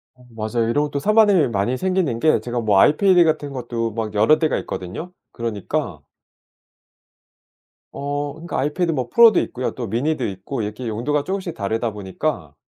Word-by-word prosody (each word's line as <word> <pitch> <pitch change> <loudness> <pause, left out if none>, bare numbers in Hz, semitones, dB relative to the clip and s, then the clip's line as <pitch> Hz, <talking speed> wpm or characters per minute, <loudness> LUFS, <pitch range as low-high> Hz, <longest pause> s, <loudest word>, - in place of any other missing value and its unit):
아 125 - -21
맞아요. 115 +1 -2
이런 145 +5 +2
것도 145 -1 -3
산만한 215 +2 +4
일이 155 - +3
많이 115 +3 -1
생기는 180 -8 0
게 155 +5 +3
제가 120 0 -3
뭐 105 -4 +3
아이패드 180 +3 +5
같은 155 -3 -1
것도 115 -3 -3
막 110 -2 -4
여러 110 +9 +4
대가 155 -2 +1
있거든요. 95 - -6 0.2
그러니까 115 -5 -4 1.9
어. 145 0 -3
그러니까 165 +3 -5
아이패드 165 +5 0
뭐 130 -5 -2
프로도 230 - +6
있고요. 125 +1 -3
또 120 -3 -4
미니도 130 +5 -1
있고 100 +6 -5
이렇게 105 +4 -5
용도가 140 +7 -1
쪼금씩 190 -2 -4
다르다 110 +3 -2
보니까 95 - -4
130 Hz, 380 characters per minute, -21 LUFS, 110-155 Hz, 1.9 s, 프로도